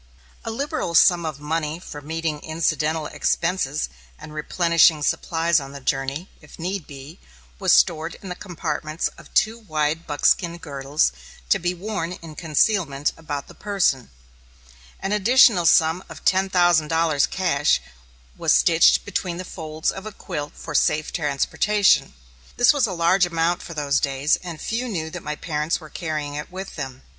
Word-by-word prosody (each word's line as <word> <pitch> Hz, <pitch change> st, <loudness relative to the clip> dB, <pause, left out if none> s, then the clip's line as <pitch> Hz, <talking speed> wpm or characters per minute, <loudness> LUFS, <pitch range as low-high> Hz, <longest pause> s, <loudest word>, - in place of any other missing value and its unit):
A -, -, -4 dB
liberal 265 Hz, -, -3 dB
sum 170 Hz, 0 st, +5 dB
of 150 Hz, -3 st, -5 dB
money 155 Hz, +1 st, -2 dB
for 150 Hz, -4 st, -9 dB
meeting 160 Hz, 0 st, -3 dB
incidental 155 Hz, 0 st, -1 dB
expenses 165 Hz, -2 st, -1 dB, 0.3 s
and 150 Hz, -, -11 dB
replenishing 165 Hz, 0 st, +3 dB
supplies 165 Hz, +2 st, +1 dB
on 135 Hz, 0 st, -9 dB
the 140 Hz, -, -7 dB
journey, 135 Hz, +5 st, -2 dB
if 150 Hz, -, -15 dB
need 180 Hz, 0 st, -4 dB
be, 140 Hz, +4 st, -11 dB, 0.4 s
was -, -, +2 dB
stored 155 Hz, -, +3 dB
in 195 Hz, -, -12 dB
the 180 Hz, -, -4 dB
compartments 160 Hz, -4 st, -3 dB
of -, -, -17 dB
two 220 Hz, +2 st, +2 dB
wide 155 Hz, -5 st, -2 dB
buckskin 170 Hz, +4 st, +1 dB
girdles, 140 Hz, -, -1 dB, 0.4 s
to -, -, +4 dB
be 175 Hz, +1 st, -1 dB
worn 180 Hz, -2 st, -4 dB
in 165 Hz, -3 st, -10 dB
concealment 155 Hz, -2 st, +1 dB
about 145 Hz, -3 st, -6 dB
the -, -, -13 dB
person. 185 Hz, -, 0 dB, 0.9 s
An 195 Hz, -, -3 dB
additional 210 Hz, -3 st, +5 dB
sum 160 Hz, +3 st, +4 dB
of -, -, -11 dB
ten 190 Hz, +1 st, +3 dB
thousand 175 Hz, -4 st, +3 dB
dollars, 160 Hz, -3 st, +2 dB
cash, 160 Hz, -6 st, +1 dB, 0.6 s
was -, -, +1 dB
stitched -, -, +4 dB
between 175 Hz, -2 st, -3 dB
the 185 Hz, -, -6 dB
folds 155 Hz, -3 st, -3 dB
of 195 Hz, +2 st, -8 dB
a -, -, -6 dB
quilt 145 Hz, -6 st, -6 dB
for 150 Hz, -, -8 dB
safe 150 Hz, +1 st, +1 dB
transportation. 180 Hz, +7 st, +2 dB, 0.4 s
This 245 Hz, -, +6 dB
was 280 Hz, -5 st, +2 dB
a -, -, -4 dB
large 175 Hz, +2 st, +3 dB
amount 170 Hz, +1 st, 0 dB
for 170 Hz, -, -9 dB
those 145 Hz, -1 st, +1 dB
days, 140 Hz, +2 st, +1 dB
and 170 Hz, -3 st, -8 dB
few 240 Hz, +3 st, -2 dB
knew 160 Hz, -8 st, -4 dB
that -, -, -6 dB
my 150 Hz, 0 st, -4 dB
parents 150 Hz, 0 st, -2 dB
were 155 Hz, -3 st, -12 dB
carrying 155 Hz, -4 st, -4 dB
it 150 Hz, +4 st, -6 dB
with 190 Hz, +1 st, -7 dB
them. 130 Hz, 0 st, -7 dB
165 Hz, 165 wpm, -23 LUFS, 150-180 Hz, 0.9 s, This